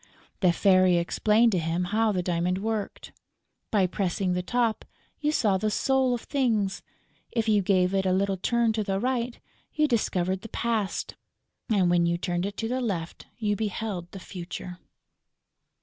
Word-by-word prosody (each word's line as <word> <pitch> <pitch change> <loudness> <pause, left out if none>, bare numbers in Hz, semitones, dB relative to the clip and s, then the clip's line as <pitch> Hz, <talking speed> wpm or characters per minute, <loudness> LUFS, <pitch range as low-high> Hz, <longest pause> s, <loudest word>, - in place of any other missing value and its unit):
The 180 -3 +4
Fairy 185 0 +4
explained 215 +6 +3
to 185 - +1
him 165 +2 -1
how 215 +4 +1
the 185 -3 -1
diamond 175 +1 0
worked. 215 0 -4 0.6
By 200 -4 +3
pressing 185 0 -1
the 180 - 0
top, 230 +3 0 0.4
you 300 0 +1
saw 205 -10 +2
the 215 +2 0
soul 265 +2 +2
of 235 - -6
Things; 225 -8 0 0.5
if 230 -2 -1
you 210 -2 +4
gave 185 -1 +2
it 190 -1 +1
a - - +2
little 195 +1 +1
turn 235 +3 +1
to 215 -1 -1
the 195 -1 -1
right, 245 0 -1 0.4
you 305 0 +3
discovered 190 -6 0
the 225 - -9
Past; 225 -4 -2 0.6
and, 200 -5 +3
when 170 -1 +3
you 170 0 +1
turned 175 +1 -1
it 200 - -7
to 225 - -2
the 255 +2 -1
left, 180 -8 -4
you 210 -2 0
beheld 205 -4 -4
the 195 - -8
Future. 180 -1 -7
200 Hz, 170 wpm, -27 LUFS, 180-225 Hz, 0.6 s, The